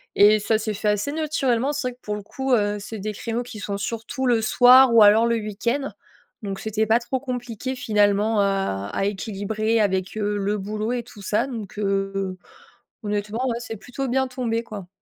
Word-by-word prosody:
et 210 +1 +6
ça 220 +1 +1
s'est 215 0 -3
fait 210 +1 -3
assez 210 +7 +1
naturellement. 285 -4 0
C'est 275 -3 -2
vrai 245 - -11
que - - -37
pour 210 0 -3
le 205 - -7
coup, 265 +4 -2
heu, 205 -2 +2
c'est 220 +2 -7
des 210 +2 -4
créneaux 230 +3 -3
qui 225 -3 -9
sont 200 0 -3
surtout 230 +5 -4
le 235 -2 +3
soir 250 +2 +7
ou 220 - +9
alors 220 +3 +6
le 235 - +2
week-end. 230 +5 -2 0.5
Donc 195 -2 -5
c'était 220 0 0
pas 225 +2 +4
trop 260 +2 -3
compliqué 250 -1 -4
finalement 210 -1 +2
à 195 - 0
à - - -1
équilibrer 215 +2 -1
avec, 190 0 0
heu, 205 -1 -1
le 205 +1 -1
boulot 215 +4 -3
et 240 -1 -2
tout 210 -3 -14
ça 215 +6 0
donc, 220 -6 -7
heu, 195 -1 0
heu, 190 -1 -3 0.7
honnêtement 210 +4 -2
ouais 235 0 -2
c'est 225 -2 -6
plutôt 260 +5 -5
bien 265 +1 +1
tombé 235 -2 -2
quoi. 205 -5 -8
220 Hz, 205 wpm, -23 LUFS, 205-245 Hz, 0.7 s, ou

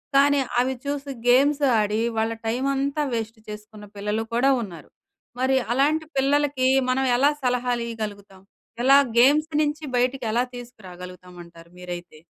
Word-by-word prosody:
కానీ, 285 0 +5 0.2
అవి 260 +1 +1
చూసి 280 0 -4 0.2
గేమ్స్ 280 +4 +4 0.2
ఆడి, 210 +1 0 0.2
వాళ్ళ 225 +1 0 0.2
టైమ్ 250 +4 -1
అంతా 280 +2 -1
వేస్ట్ 225 0 -4
చేసుకున్న 210 0 -10
పిల్లలు 210 +2 -2
కూడా 255 +4 +3
ఉన్నారు. 175 -7 -9 0.5
మరి 265 +1 +2 0.2
అలాంటి 305 +4 +1
పిల్లలకి 275 -1 +1 0.2
మనం 265 +1 +1
ఎలా 280 +4 +4
సలహాలు 245 -1 0
ఇయ్యగలుగుతాం? 205 -4 -7 0.4
ఎలా 275 +2 +7 0.2
గేమ్స్ 295 +6 +4
నుంచి 300 +1 -2
బయటికి 250 0 0
ఎలా 240 +1 +2
తీసుకురాగలుగుతాం 180 -6 -11
అంటారు 170 0 -17
మీరైతే? 175 -3 -9
245 Hz, 135 wpm, -23 LUFS, 210-275 Hz, 0.5 s, ఎలా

